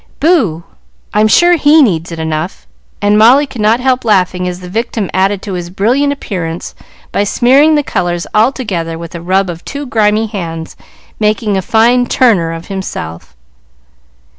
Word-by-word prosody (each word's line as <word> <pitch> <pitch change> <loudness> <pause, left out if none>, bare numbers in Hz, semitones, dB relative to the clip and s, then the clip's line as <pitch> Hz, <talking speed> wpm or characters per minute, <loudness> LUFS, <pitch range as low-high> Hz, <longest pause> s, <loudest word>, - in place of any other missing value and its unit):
"Boo 230 - +1 0.5
I'm 215 +1 +3
sure 345 +9 +4
he 300 +1 +5
needs 170 - -1
it 165 - -6
enough;" 160 +2 -4 0.4
and 205 +1 +3
Molly 255 +7 +6
could 255 -5 -8
not 220 +3 +3
help 255 0 0
laughing 185 -4 +1
as 180 0 -5
the 180 - -10
victim 220 0 -3
added 195 +1 0
to 200 - -5
his 175 -1 -5
brilliant 245 +10 +1
appearance 175 -11 -5 0.4
by 200 - 0
smearing 270 +9 +3
the 295 - +1
colors 175 -7 -2
all 220 +5 +4
together 170 -11 -4
with 170 0 -9
a 170 - -7
rub 190 +3 +1
of 170 -1 -7
two 285 +1 -6
grimy 220 -2 +1
hands, 165 -7 -6 0.4
making 210 -1 0
a 190 - 0
fine 235 +5 +2
"Turner" 195 -10 +2
of 165 0 -7
himself. 85 - -7
205 Hz, 165 wpm, -13 LUFS, 175-245 Hz, 0.5 s, Molly